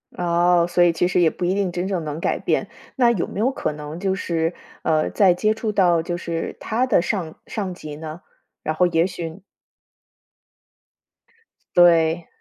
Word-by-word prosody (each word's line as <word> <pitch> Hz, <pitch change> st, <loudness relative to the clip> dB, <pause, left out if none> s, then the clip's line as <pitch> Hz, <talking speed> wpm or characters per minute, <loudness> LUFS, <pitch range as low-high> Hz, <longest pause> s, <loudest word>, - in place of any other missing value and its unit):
哦， 175 Hz, 0 st, +3 dB
所 175 Hz, 0 st, +3 dB
以 170 Hz, -1 st, +4 dB
其 175 Hz, -, +1 dB
实 180 Hz, -, +1 dB
也 170 Hz, -2 st, +5 dB
不 180 Hz, -, -7 dB
一 180 Hz, +2 st, +2 dB
定 195 Hz, -3 st, 0 dB
真 175 Hz, +1 st, -3 dB
正 185 Hz, -5 st, -2 dB
能 150 Hz, +1 st, -4 dB
改 -, -, 0 dB
变， -, -, -1 dB, 0.3 s
那 240 Hz, -3 st, +4 dB
有 190 Hz, -7 st, -1 dB
没 -, -, -6 dB
有 255 Hz, +4 st, +2 dB
可 155 Hz, -, -3 dB
能 150 Hz, +2 st, -7 dB
就 190 Hz, -1 st, 0 dB
是， 165 Hz, -2 st, -1 dB, 0.3 s
呃， 155 Hz, -1 st, +1 dB
再 190 Hz, -4 st, +4 dB
接 215 Hz, +4 st, +1 dB
触 220 Hz, -1 st, -3 dB
到 175 Hz, -5 st, +3 dB
就 175 Hz, +1 st, -3 dB
是 170 Hz, -1 st, -4 dB
他 235 Hz, +4 st, 0 dB
的 205 Hz, -8 st, +3 dB
上 175 Hz, -4 st, -3 dB
上 195 Hz, -4 st, -4 dB
级 155 Hz, -4 st, -8 dB
呢？ 160 Hz, +3 st, -8 dB, 0.4 s
然 155 Hz, -, -1 dB
后 180 Hz, +2 st, +3 dB
也 165 Hz, 0 st, +2 dB
许 175 Hz, -1 st, -6 dB, 2.3 s
对。 170 Hz, -1 st, +4 dB
175 Hz, 195 characters per minute, -22 LUFS, 165-190 Hz, 2.3 s, 也